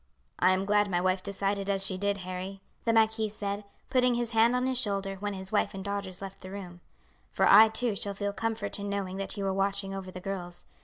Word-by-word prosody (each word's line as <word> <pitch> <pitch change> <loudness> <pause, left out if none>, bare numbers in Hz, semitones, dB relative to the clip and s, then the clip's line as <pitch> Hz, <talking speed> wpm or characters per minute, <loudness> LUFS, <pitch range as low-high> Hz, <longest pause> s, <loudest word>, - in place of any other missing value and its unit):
"I 185 - +5
am 185 +1 +2
glad 205 0 +3
my 175 -2 +1
wife 185 +1 +1
decided 200 0 -1
as 195 -1 +2
she 190 - 0
did, 200 +1 0
Harry," 185 +1 -6 0.2
the 230 - +3
marquis 220 -1 +3
said, 205 0 -4 0.3
putting 250 -1 +3
his 240 -1 -1
hand 230 +2 +4
on 250 0 +1
his 260 -1 +1
shoulder 195 -4 -1
when 205 0 -2
his 190 0 -6
wife 205 -2 +1
and 190 0 -6
daughters 200 -2 -4
left 195 0 -8
the 185 - -8
room, 180 -3 -8 0.5
"for - - +1
I 215 +3 +9
too 220 0 0
shall 200 0 -2
feel 200 0 -2
comfort 220 -2 -2
in 200 0 -4
knowing 195 -2 -3
that 195 +2 -4
you 200 - -2
are 195 - +1
watching 195 0 0
over 190 -1 -6
the 185 - -8
girls. 180 -2 -6
200 Hz, 235 wpm, -29 LUFS, 190-210 Hz, 0.5 s, I